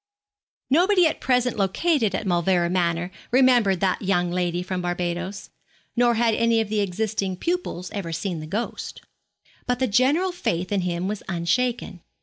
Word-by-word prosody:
Nobody 360 +4 +4
at 315 - 0
present 250 -2 +1
located 215 - +1
at 210 - -3
Mauleverer 175 -1 +1
Manor 175 -1 0 0.2
remembered 245 -7 +4
that 190 -2 +1
young 180 -3 +1
lady 175 0 -1
from 185 0 -3
Barbados, 175 +2 -3 0.4
nor 240 -1 +3
had 230 0 +2
any 230 +1 +2
of 220 -2 -1
the 215 0 0
existing 195 -1 -2
pupils 335 - -3
ever 190 -5 -4
seen 170 0 -3
the 155 - -7
ghost. 215 +8 -4 0.7
But 245 0 +1
the 260 - +1
general 265 - +2
faith 180 - -2
in 200 -2 +1
him 175 0 -2
was 210 0 -3
unshaken. 185 +2 -1
195 Hz, 155 wpm, -24 LUFS, 175-245 Hz, 0.7 s, Nobody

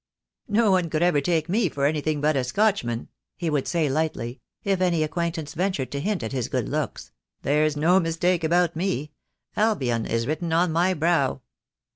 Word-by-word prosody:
"No 215 -1 +3
one 180 -3 +2
would 155 +1 +1
ever 175 -5 +3
take 160 +1 0
me 195 +1 +1
for 140 -1 -1
anything 150 0 0
but 155 0 +2
a 135 - +1
Scotchman," 125 - 0 0.3
he 170 -3 -2
would 145 -3 0
say 165 -4 +1
lightly, 135 -4 -2 0.2
if 195 -2 0
any 170 -4 +2
acquaintance 160 -1 -3
ventured 180 -6 -1
to 140 - -3
hint 190 - -1
at 110 - -4
his 130 -4 -2
good - - -2
looks. - - -3 0.3
"There's 150 +1 +2
no 175 +5 +4
mistake 170 +1 0
about 170 +1 +2
me. 165 -4 -2 0.4
Albion 135 - +1
is 115 0 0
written 160 +4 -2
on 170 +1 +3
my 175 +3 +2
brow." 155 -5 +1
160 Hz, 180 wpm, -25 LUFS, 145-180 Hz, 0.4 s, no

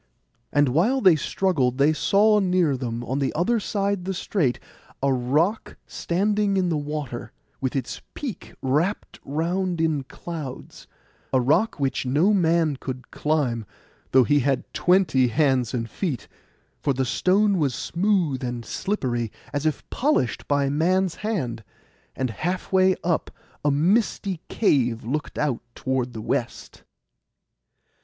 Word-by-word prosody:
And 145 -2 +3
while 195 - +2
they 185 -8 +6
struggled 140 -5 0
they 145 +3 +4
saw 210 +6 +4
near 180 -6 +2
them, 120 -2 -4
on 130 +3 -2
the 135 - 0
other 225 +8 +2
side 200 -2 -1
the 190 0 -2
strait, 160 - 0 0.4
a 140 -1 +3
rock 150 - 0
stand 205 +4 -1
in 195 -3 +2
the 165 - +1
water, 145 -4 -4 0.3
with 130 0 -2
its 130 -3 -3
peak 265 -8 -6
wrapt 150 +10 -1
round 175 +4 -1
in 160 -3 +1
clouds—a 135 -3 -6
rock 155 - +2
which 135 -1 -1
no 155 +11 +3
man 165 -5 +2
could 130 -2 -7
climb, 140 -7 0 0.5
though 130 0 +6
he 145 +4 +3
had 135 -1 +1
twenty 175 -9 +3
hands 130 -2 +2
and 115 -3 -2
feet, 135 - -3 0.5
for 140 - +1
the 130 0 0
stone 195 - +2
was 140 -5 +1
smooth 170 -8 0
and 120 -2 -4
slippery, 120 - -2 0.2
as 145 +2 0
if 155 - -2
polished 270 - 0
by 140 -1 +2
man's 175 +5 +1
hand; 130 - -2 0.5
and 130 -3 -1
halfway 185 - +1
up 170 -2 0 0.3
a 150 - +3
misty 185 +3 +1
cave 125 - +1
looked 145 +7 -3
out 145 -5 0
toward 130 -2 -2
the 110 - -6
west. - - -3
150 Hz, 135 wpm, -24 LUFS, 130-185 Hz, 0.5 s, they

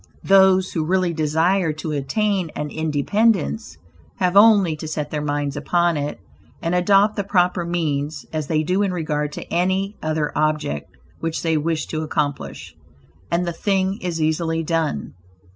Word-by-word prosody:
Those 190 -1 +5
who 160 - -1
really 180 +1 +1
desire 160 +3 +1
to 155 +1 -5
attain 185 +6 0
an 150 0 -4
independence, 155 - 0 0.4
have 180 0 0
only 200 -6 +6
to 155 - -6
set 150 -1 -4
their 150 - -2
minds 145 -1 -2
upon 175 -1 +1
it, 145 0 -3 0.4
and 165 +1 -2
adopt 195 +4 +3
the 200 - 0
proper 180 -2 +1
means, 155 -3 -2
as 155 -2 -2
they 155 -1 +1
do 185 +5 +1
in 200 -2 +1
regard 150 -3 -2
to - - -6
any 190 +4 0
other 155 -1 -1
object 150 - -1 0.3
which 165 0 -3
they 165 -1 +1
wish 155 0 -1
to 155 - -4
accomplish, 115 - -3 0.5
and 175 +1 0
the 170 - -2
thing 195 +2 0
is 175 -2 -3
easily 160 +1 0
done. 160 - -1
165 Hz, 160 wpm, -21 LUFS, 150-185 Hz, 0.5 s, only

